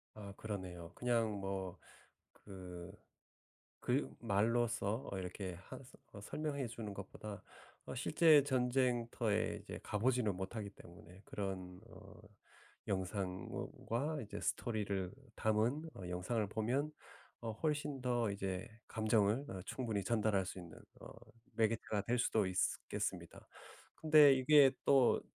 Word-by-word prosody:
아. 100 -2 -8
그러네요. 90 -5 -5
그냥 115 -3 +1
뭐 95 -2 -3 0.6
그 90 -2 -9 0.9
글 130 +4 +2
말로써 115 +2 +1
어 95 - -3
이렇게 90 0 -4
하서 130 +9 -11 0.2
설명해 140 +4 -2
주는 115 -2 -6
것보다 100 +1 -7 0.4
어 - - -5
실제 155 -4 +6
전쟁터에 125 -4 +1
이제 - - -7
가 - - -3
보지는 120 -4 +2
못하기 100 +3 -4
때문에 95 +1 -14
그런 95 -2 -5
어 100 -3 -13 0.7
영상 95 -1 -2
뭔 - - -4 0.2
과 145 +7 0
이제 105 - -6
스토리를 100 -5 -1 0.2
담은 115 +9 +1
어 90 -2 -7
영상을 95 +5 0
보면 130 +8 0 0.5
어 115 -2 -3
훨씬 145 +1 -1
더 120 -3 +1
이제 95 -2 -3 0.2
감정을 110 +4 +2
어 95 -1 -5
충분히 110 -6 -2
전달할 105 -2 +2
수 90 0 -6
있는 85 -3 -10 0.2
어 - - -9 0.5
매개체가 110 -2 +1
될 120 +4 0
수도 110 -3 +2
있쓰 95 0 +1
겠습니다. - - -4 0.5
근데 150 -3 +8
이게 135 +1 +7
또 135 -3 +5
110 Hz, 250 characters per minute, -37 LUFS, 95-125 Hz, 0.9 s, 근데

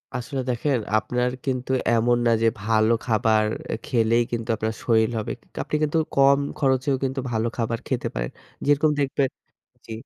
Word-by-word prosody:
আসলে 130 +2 -3
দেখেন 130 +3 +1 0.2
আপনার 125 +3 0 0.2
কিন্তু 130 -1 -2 0.2
এমন 120 +1 +3
না 115 - +4
যে 115 - +4
ভালো 110 +1 +2
খাবার 110 -2 +2 0.3
এ - - 0
খেলেই 115 0 +2
কিন্তু 115 0 -3
আপনার 110 0 -2
শরীর 110 -1 +3
হবে। 110 - -3
কি - - -29 0.2
আপনি - - -3
কিন্তু 155 +2 +1 0.2
কম 140 0 +5 0.2
খরচেও 135 -1 +2
কিন্তু 135 +1 -1
ভালো 110 0 0
খাবার 115 0 -1
খেতে 125 -3 -1
পারেন। - - -2 0.3
যেরকম 145 +2 +3
দেখবেন 135 -1 +1 0.6
জি, - - -11
120 Hz, 165 wpm, -24 LUFS, 110-135 Hz, 0.6 s, কম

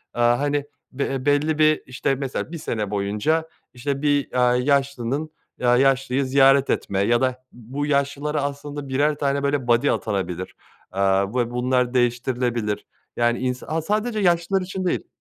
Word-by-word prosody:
Eee, 120 - -1
hani, 140 +4 +2 0.3
be 140 +1 -2
e 135 0 -4
belli 145 +2 +2
bir 155 0 +4
işte, 130 +1 -1
mesela 135 +3 -4
1 170 - -5
sene 110 -9 -3
boyunca, 105 +11 0 0.2
işte, 135 +3 -3
bir, 145 -1 +1
aaa, 125 0 +4
yaşlının 140 +2 0 0.3
eee, 125 - 0
yaşlıyı 135 +1 +3
ziyaret 135 +1 +4
etme 95 -1 -1
ya 120 +5 +2
da 130 0 -1
bu 130 +5 -5
yaşlılara 145 +1 0
aslında 145 0 -5
1'er 145 +3 +2
tane, 140 -1 -1
böyle, 140 -3 0
buddy 120 0 +3
atanabilir, 95 -3 -3 0.4
aaa, 95 0 +2
ve 120 -1 0
bunlar 125 0 0
değiştirilebilir, 120 -3 0 0.3
yani, 120 0 +2
ins 125 0 -2
aaa, 160 +1 -2
sadece 215 +5 -1
yaşlılar 180 +1 +2
için 185 0 -4
değil 175 - -1
135 Hz, 160 wpm, -23 LUFS, 120-145 Hz, 0.4 s, bir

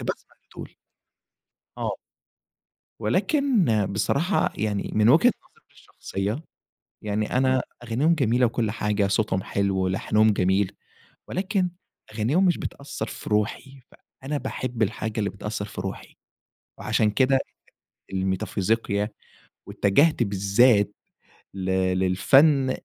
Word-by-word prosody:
كنت - - -6
باسمع - - -9
لدول. - - -11 1.0
آه. - - -2 1.0
ولكن 275 - +2 0.3
بصراحة 140 - +1
يعني 105 -1 -2
من 110 +1 +4
وجهة 165 - +6 0.2
نظري - - -30
الشخصية، 105 +11 -5 0.6
يعني 105 +3 -1
أنا 130 -1 +3 0.2
أغانيهم 130 +8 +2
جميلة 125 -3 +2
وكل 115 -2 -1
حاجة، 105 -2 0
صوتهم 100 -2 0
حلو 100 -1 -1
ولحنهم 100 +3 +2
جميل، 95 0 +1 0.6
ولكن 190 -1 -1 0.4
أغانيهم 130 - +2
مش 175 - +3
بتأثر 140 -5 -5
في - - -8
روحي، 110 +6 -1 0.4
فأنا 145 +2 -3
باحب 125 -4 -4
الحاجة 110 +1 -3
اللي 100 - 0
بتأثر 105 +1 -5
في 95 -3 -7
روحي، 95 0 -7 0.6
وعشان 110 0 +1
كده 135 +3 +3 0.7
الميتافيزيقيا، 100 +3 -1 0.6
واتجهت 140 +7 +3
بالذات 100 +2 +3 0.6
ل 95 -1 -5 0.3
للفن 135 - +4
110 Hz, 110 wpm, -24 LUFS, 100-135 Hz, 1.0 s, وجهة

